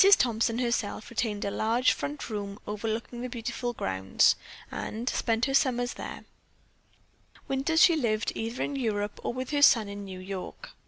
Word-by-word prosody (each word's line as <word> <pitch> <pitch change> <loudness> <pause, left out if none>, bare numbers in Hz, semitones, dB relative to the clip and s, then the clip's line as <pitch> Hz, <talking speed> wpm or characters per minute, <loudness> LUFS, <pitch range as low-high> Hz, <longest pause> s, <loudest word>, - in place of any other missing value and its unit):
Thompson, 230 -1 +1
herself, 235 -2 -1
retained 215 -3 -1
a 200 - -1
large 230 +5 +2
front 290 +1 -5
room 205 -2 -4
overlooking 225 +3 -3
the 250 - -4
beautiful 240 +1 -3
grounds, 95 - +2 0.4
and 230 +3 -4
spent 230 -2 +1
her 270 - -1
summers 245 -2 +2
there; - - -7 1.2
winters 275 +5 +3
she 340 - +7
lived 225 -7 0
either 230 +2 -3
in 285 - -3
Europe 210 -5 -1
or - - -1
with 255 +2 -5
her 290 -1 +1
son 230 -7 +6
in 200 0 -6
New 190 -2 -7
York. 195 - -7
230 Hz, 160 wpm, -28 LUFS, 210-255 Hz, 1.2 s, she